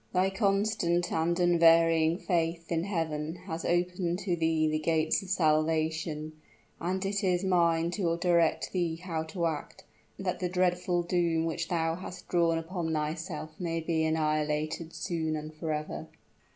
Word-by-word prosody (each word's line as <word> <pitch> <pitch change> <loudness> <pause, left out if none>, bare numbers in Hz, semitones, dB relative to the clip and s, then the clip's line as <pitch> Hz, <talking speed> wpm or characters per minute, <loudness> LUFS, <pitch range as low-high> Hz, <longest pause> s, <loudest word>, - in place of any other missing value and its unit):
Thy 185 +1 +2
constant 195 -4 +1
and 165 +2 +1
unvarying 165 -1 +5
faith 170 -3 -1
in 165 +1 0
Heaven 160 -4 -2
has 165 -3 -4
opened 175 0 0
to 180 -3 +1
thee 160 -1 +1
the 155 0 0
gates 160 0 +1
of 195 - -10
salvation; 155 -2 +1 0.5
and 185 +3 -2
it 200 +1 -1
is 180 -1 +1
mine 170 -3 +2
to 175 -3 0
direct 170 -2 +2
thee 175 -3 0
how 165 -2 -4
to 170 +2 -3
act, 155 -3 -4 0.3
that 185 -2 -2
the 180 -1 -1
dreadful 180 -1 +1
doom 170 -2 +1
which 165 0 -2
thou 165 -2 0
hast 180 +1 -8
drawn 170 -2 +3
upon 165 0 -3
thyself 155 +1 -3
may 165 -2 -1
be 160 -1 0
annihilated 155 +1 0
soon 165 -4 -2
and 155 0 -6
forever." 155 -1 -4
165 Hz, 150 wpm, -29 LUFS, 160-180 Hz, 0.5 s, unvarying